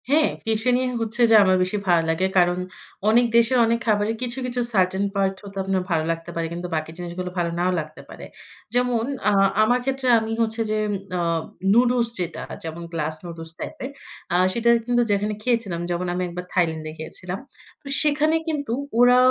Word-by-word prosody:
হ্যাঁ, 300 +2 +4 0.2
টিফিনে 235 +3 +1 0.2
হচ্ছে 225 +2 -1
যে - - +8
আমার 185 -1 +4
বেশি 185 +3 -2
ভালো 170 -2 +4
লাগে। 165 +3 +1
কারণ 175 0 +4 0.5
অনেক 240 +2 +5
দেশের 235 +2 +4
অনেক 230 +1 +1
খাবারের 210 +1 +2
কিছু, 245 0 -3
কিছু 250 0 -2
সার্টেন 190 0 +2
পার্ট 195 -1 +1
ও - - -8
তো - - -11
আপনার 190 -1 0
ভালো 160 -2 +2
লাগতে 165 +1 -5
পারে। 165 -1 -1
কিন্তু 175 +1 -5
বাকি 155 0 -3
জিনিসগুলো 180 +1 -5
ভালো 170 -1 0
নাও 180 +1 +2
লাগতে 155 0 -8
পারে। - - -10 0.5
যেমন 245 -2 +2 0.3
আ - - +3 0.3
আমার 245 +3 +3
ক্ষেত্রে 270 -1 -1
আমি 220 0 -4
হচ্ছে 225 0 0
যে, 215 - +1
ঊম 205 - -1 0.2
আ - - 0 0.5
নুডলস 240 0 +3
যেটা, 175 -2 -4 0.2
যেমন 165 +1 -6
গ্লাস 155 -1 -2
নুডলস 165 -1 -6
টাইপ - - -6
এর। - - -4 0.4
আ - - +2 0.2
সেটা 235 0 +1 0.2
কিন্তু 240 0 +2
যেখানে 205 +1 0
খেয়েছিলাম, 230 -8 0
যেমন 175 +1 -2
আমি 180 - -2
একবার 175 +1 -6
থাইল্যান্ডে 160 -4 0
খেয়েছিলাম। 185 +4 -6 0.4
তো - - -14
সেখানে 305 +1 +2
কিন্তু 285 -6 -2 0.3
ওরা 245 0 +6
200 Hz, 185 wpm, -23 LUFS, 175-240 Hz, 0.5 s, যে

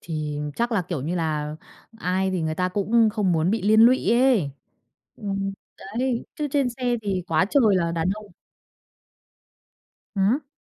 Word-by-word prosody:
Thì 155 -3 -4 0.2
chắc 235 +1 0
là, 205 -5 +1
kiểu 170 -4 -4
như 165 +5 -2
là, 155 -3 -2 0.4
ai 190 -1 0
thì 185 -3 -1
người 160 0 -1
ta 180 +2 0
cũng 220 +4 +2
không 200 -5 +1
muốn 165 +2 +1
bị 220 -2 -1
liên 215 +2 +5
lụy 235 -2 +5
ấy. 240 - +3 0.7
Ừm, 195 -2 -3 0.5
đấy, 250 -2 0
chứ 300 -1 -3
trên 275 -2 +2
xe 245 0 -1
thì 195 -3 -1
quá 165 +2 +2
trời 225 -9 +4
là 170 -2 0
đàn 165 +1 -1
ông. 215 0 -10 1.9
Hửm? 225 +9 +1
195 Hz, 165 wpm, -24 LUFS, 170-235 Hz, 1.9 s, liên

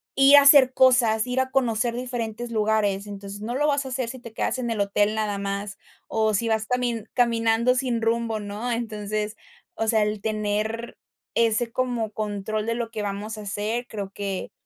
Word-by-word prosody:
ir 275 +1 +7
a 285 - +10
hacer 280 -2 +7
cosas, 245 -4 +4
ir 250 +1 -1
a 260 0 0
conocer 240 -3 0
diferentes 240 -2 -4
lugares. 210 -2 +1
Entonces, 200 0 -8
no 235 +3 -3
lo 295 +3 +2
vas 285 -1 +1
a - - -5
hacer 255 -2 -2
si 260 +1 -7
te 235 -2 -11
quedas 260 - -1
en 240 -2 -2
el 225 -2 -2
hotel 205 +1 +1
nada 210 -2 -1
más, 200 0 -4 0.3
o 220 -1 +1
si 230 +3 0
vas 220 0 0
también 240 -3 -1
caminando 235 0 +2
sin 245 -3 -1
rumbo, 225 -1 0
¿no? 205 +4 -5
Entonces, 215 -2 -3 0.4
o 225 - -2
sea, 220 -1 +3
el 210 0 -2
tener 215 +2 -2 0.4
ese 230 0 +2
como 240 -3 -1
control 210 0 -3
de 230 0 -1
lo 235 -1 -3
que 220 -2 -4
vamos 205 +2 -4
a - - -7
hacer, 210 +4 -3
creo 200 -3 -6
que, 200 -2 -4
225 Hz, 190 wpm, -24 LUFS, 210-240 Hz, 0.4 s, a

